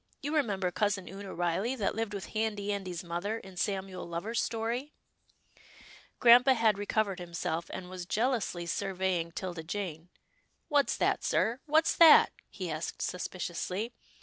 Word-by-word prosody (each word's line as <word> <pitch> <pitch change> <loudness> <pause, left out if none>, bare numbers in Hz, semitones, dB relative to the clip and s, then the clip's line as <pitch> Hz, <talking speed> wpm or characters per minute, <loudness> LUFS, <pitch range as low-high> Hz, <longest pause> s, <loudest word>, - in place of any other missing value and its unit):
You 295 +3 -2
remember 200 -11 +1
Cousin 205 -1 0
Oonah 195 0 -8
Riley, 175 +8 0
that 210 -6 -1
lived 220 -2 -3
with 195 - -5
Handy 210 -2 -1
Andy's 185 -4 -4
mother 175 +6 -3
in 190 -4 -12
Samuel 190 -1 -3
Lover's 185 +8 -2
story? 235 +6 -2 0.6
" - - -22
Grampa 245 +2 +7
had 220 -3 +3
recovered 205 -2 0
himself, 170 -1 -3
and 185 -1 -6
was 180 -1 -7
jealously 220 -6 0
surveying 185 -2 -1
'Tilda 175 -1 -5
Jane. 170 -1 -5 0.3
" - - -44
What's 290 -1 +2
that, - - +1
sir 235 +3 +1
— - - -44
what's 310 +2 +3
that? 330 -2 +8
" - - -46
he 185 -4 -5
asked 155 +1 -4
suspiciously. 185 +4 -3
195 Hz, 155 wpm, -30 LUFS, 180-225 Hz, 0.6 s, that